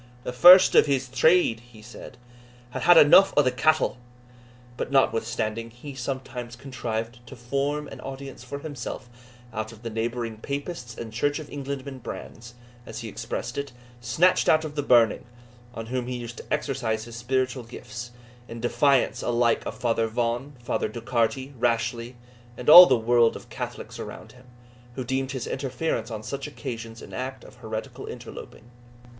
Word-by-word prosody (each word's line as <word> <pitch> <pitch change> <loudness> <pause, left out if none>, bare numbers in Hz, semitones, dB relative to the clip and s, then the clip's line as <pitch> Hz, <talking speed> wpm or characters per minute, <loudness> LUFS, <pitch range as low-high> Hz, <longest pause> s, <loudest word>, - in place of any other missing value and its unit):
"The 125 - -4
first 180 +8 +9
of - - +6
his 135 -2 0
trade," 130 -1 +3
he 120 -2 -17
said, 120 +2 -11 0.5
"had - - -5
had 175 +1 +7
eneugh 160 +6 +7
o'thae 135 -3 +4
cattle." 155 +2 +2 0.8
But, - - -4
notwithstanding, 115 -4 0
he 120 +5 -10
sometimes 130 -2 -5
contrived 120 -3 -5
to 135 - -10
form 140 +4 -2
an 135 - -10
audience 135 -1 -8
for 130 +2 -6
himself 140 -4 -7 0.4
out 110 0 -4
of 115 0 -15
the 115 - -5
neighbouring 115 0 -3
Papists 140 -1 -6
and 110 -2 -7
Church 145 +5 0
of 155 -2 -9
Englandmen 140 -1 -6
brands, 120 0 -9 0.3
as - - -8
he - - -6
expressed - - -5
it, 140 -2 -6 0.3
snatched 155 +10 +2
out 155 0 +4
of 150 - -6
the 150 - -1
burning, 120 -5 +4 0.5
on 115 - -5
whom 125 +1 -3
he 125 -1 -3
used 120 0 -8
to - - -11
exercise 115 -5 -1
his 120 0 -10
spiritual 130 +2 -1
gifts, 120 0 -9 0.4
in 115 - -8
defiance 135 +3 +2
alike 120 -1 +1
of - - -6
Father 115 -2 0
Vaughan, 120 +5 -2
Father 115 - -1
Docharty, 120 +4 -1
Rashleigh, 115 +1 -1 0.4
and 125 +4 +2
all 180 +2 +13
the 130 - +4
world 115 0 +3
of - - -11
Catholics - - -7
around - - -8
him, 125 0 -18 0.5
who 130 - -3
deemed 130 +2 -2
his 130 -3 -4
interference 130 -3 -3
on 110 -2 -6
such 140 +4 -5
occasions 115 -5 -7
an - - -12
act 130 +1 -5
of - - -15
heretical - - -6
interloping. 120 +2 -10
125 Hz, 165 wpm, -25 LUFS, 115-140 Hz, 0.8 s, all